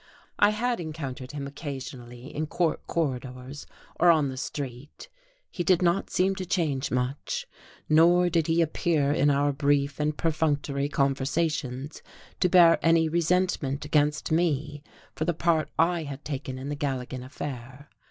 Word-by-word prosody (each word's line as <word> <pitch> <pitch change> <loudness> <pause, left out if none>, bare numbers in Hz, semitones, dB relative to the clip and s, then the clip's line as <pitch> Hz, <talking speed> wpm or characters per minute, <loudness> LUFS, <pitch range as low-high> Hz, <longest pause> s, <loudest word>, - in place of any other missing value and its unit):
I 205 - +6
had 235 +2 -1
encountered 140 -6 -6
him 140 -2 -4
occasionally 130 -3 -8
in 155 +1 -2
court 165 +1 -1
corridors 130 -3 -4 0.3
or 175 - +6
on 155 -4 +4
the 130 - -6
street; 140 - -7 0.4
he 175 - -3
did 180 0 +3
not 175 +3 +1
seem 190 +1 +2
to 190 - -3
change 150 -8 0
much; 135 - -2 0.4
nor 170 +3 +5
did 165 -3 +1
he 165 +1 +3
appear 155 -2 +1
in 145 0 +3
our 145 0 +2
brief 140 0 +1
and 150 0 0
perfunctory 145 -3 0
conversations 140 0 -1 0.4
to 180 - +3
bear 170 -2 +6
any 165 -1 +4
resentment 170 -4 0
against 150 0 +1
me 150 -3 0 0.3
for 155 - -2
the 175 -1 0
part 165 -1 +1
I 170 +1 +2
had 145 -2 -7
taken 135 -3 -4
in 135 +2 -6
the 145 - -2
Galligan 130 -3 -3
affair. 130 0 -7
150 Hz, 150 wpm, -27 LUFS, 140-165 Hz, 0.4 s, I